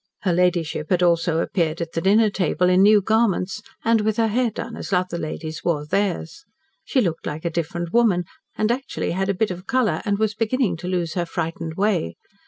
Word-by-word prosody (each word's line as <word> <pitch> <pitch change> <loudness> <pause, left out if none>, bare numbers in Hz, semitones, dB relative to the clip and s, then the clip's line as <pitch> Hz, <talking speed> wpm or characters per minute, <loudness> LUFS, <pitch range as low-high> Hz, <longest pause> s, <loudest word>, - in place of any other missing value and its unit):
Her 185 -3 +1
ladyship 170 -3 0
had 180 -1 +2
also 170 -1 +2
appeared 165 -3 -1
at 170 -1 -4
the 165 - -2
dinner 210 +3 +4
table 180 -1 +1
in 185 +1 +4
new 210 +1 +6
garments, 210 -2 +1 0.2
and 225 -1 +4
with 215 0 0
her 225 -1 +2
hair 240 +2 +1
done 220 - -6
as - - -7
other 180 -2 0
ladies 155 0 -5
wore 150 -4 0
theirs. 195 - -2 0.4
She 265 - +1
looked 170 -6 -2
like 155 +3 -5
a 170 - 0
different 170 +1 -3
woman, 220 -7 +3 0.3
and 215 +1 +2
actually 265 +3 -2
had 190 +3 -1
a 195 - +1
bit 210 +1 0
of 180 +1 -8
colour, 255 -4 +1
and 205 -1 0
was 220 0 0
beginning 225 -2 0
to 175 - -7
lose 175 -3 -1
her 175 -2 -2
frightened 165 -1 -4
way. 190 - 0
185 Hz, 205 wpm, -22 LUFS, 170-215 Hz, 0.4 s, new